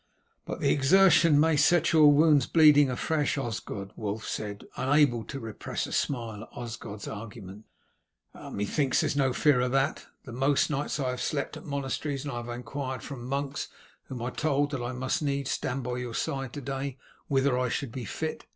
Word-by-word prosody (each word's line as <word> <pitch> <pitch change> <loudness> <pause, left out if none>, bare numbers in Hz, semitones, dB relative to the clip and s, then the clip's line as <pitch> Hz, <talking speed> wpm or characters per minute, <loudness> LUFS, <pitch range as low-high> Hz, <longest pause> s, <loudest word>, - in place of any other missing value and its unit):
"But - - -5
the - - +3
exertion 165 +1 +5
may 160 +1 +4
set 170 +3 +3
your 155 -2 +7
wounds 145 -2 +4
bleeding 150 -3 +6
afresh, 145 +4 0
Osgod," 105 -6 -4
Wulf 110 0 -4
said, 105 -1 -5
unable 135 -4 +3
to 135 - -6
repress 115 -3 -4
a - - -8
smile 115 -6 -2
at - - -10
Osgod's 115 -3 -7
argument. 105 -1 -8 0.7
"Methinks 130 +7 -1
there - - +1
is - - -2
no 135 -2 +2
fear 130 0 +3
of 125 0 0
that. 135 0 0 0.2
The 130 - -8
most 135 +5 +1
nights 150 +1 -2
I 130 -2 0
have 125 - -5
slept 140 -2 -2
at - - -10
monasteries, 140 0 -3
and 145 - -4
have 120 0 -5
inquired 130 +2 -5
from 140 -3 -7
the 120 - -8
monks, 140 +2 -2 0.4
whom 125 -3 -6
I 125 - -2
told 145 0 0
that 140 -4 -3
I 120 +1 -3
must 130 +3 -2
needs 140 -2 -1
stand 130 0 -2
by 125 0 -3
your 125 -2 -5
side 135 -3 -3
to 145 - -6
day, 135 0 -4 0.3
whether 135 -1 +2
I 125 0 0
should 135 0 -3
be 125 -1 -6
fit. 160 +9 -4
135 Hz, 190 wpm, -28 LUFS, 120-145 Hz, 0.7 s, your